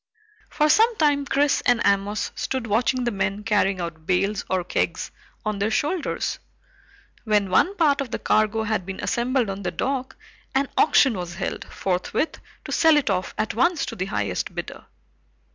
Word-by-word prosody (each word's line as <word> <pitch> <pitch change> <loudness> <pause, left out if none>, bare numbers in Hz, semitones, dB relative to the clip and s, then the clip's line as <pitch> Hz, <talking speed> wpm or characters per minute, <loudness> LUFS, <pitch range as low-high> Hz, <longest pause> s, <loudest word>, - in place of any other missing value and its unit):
For 300 - +2
some 450 +9 +4
time 290 -5 +2
Chris 285 +1 +2
and 245 -1 +3
Amos 200 +1 +1
stood 260 -3 -3
watching 240 +4 +1
the 240 - 0
men 195 0 -2
carrying 205 -3 +1
out 170 -2 -6
bales 195 +2 +1
or 185 -1 0
kegs 175 - -2 0.3
on 215 -1 -2
their 205 +2 +1
shoulders. 300 +9 -1 0.8
When 210 -4 +1
one 360 - +3
part 290 -4 +3
of 270 - -4
the - - -3
cargo 215 +1 +1
had 220 -3 -1
been 190 +1 -7
assembled 245 0 0
on 195 0 -5
the 180 - -2
dock, 260 +9 -3 0.4
an 275 0 +1
auction 275 -4 +5
was 175 -2 -5
held 190 - -4
forthwith 185 - -2 0.3
to - - -6
sell 320 -2 +5
it 260 -8 +1
off 185 -1 -2
at 220 - -1
once 330 +7 +2
to - - -6
the 185 - -2
highest 100 - -3
bidder. - - -6
215 Hz, 175 wpm, -24 LUFS, 195-275 Hz, 0.8 s, auction